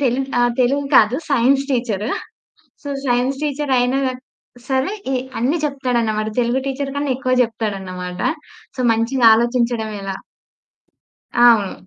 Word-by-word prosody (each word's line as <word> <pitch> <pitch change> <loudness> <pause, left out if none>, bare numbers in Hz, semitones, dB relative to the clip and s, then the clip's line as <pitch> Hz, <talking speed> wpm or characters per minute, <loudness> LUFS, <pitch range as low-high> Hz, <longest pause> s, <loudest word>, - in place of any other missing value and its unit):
తెలు 260 -1 +1 0.2
ఆహ్, 240 0 +2
తెలుగు 275 +3 +2
కాదు, 220 +3 +5
సైన్స్ 275 +2 +3
టీచర్. 225 -5 -1 0.8
సో, 285 - -7 0.2
సైన్స్ 255 +3 0
టీచరయినా 270 -3 +1 0.7
సరే 265 +8 0 0.2
ఎ - - +1 0.2
అన్ని 265 +8 +1
చెప్తాడనమాట. 240 -6 -1
తెలుగు 240 +2 0
టీచర్ 275 0 -3
కన్నా 285 -1 -1
ఎక్కువ 255 -1 0
చెప్తాడనమాట. 190 -5 -4 0.6
సో, 255 - -4
మంచిగా 230 +2 +1
ఆలోచించడవెలా? 225 -4 -1 1.2
అవును. 230 -5 +5
245 Hz, 110 wpm, -19 LUFS, 225-270 Hz, 1.2 s, కాదు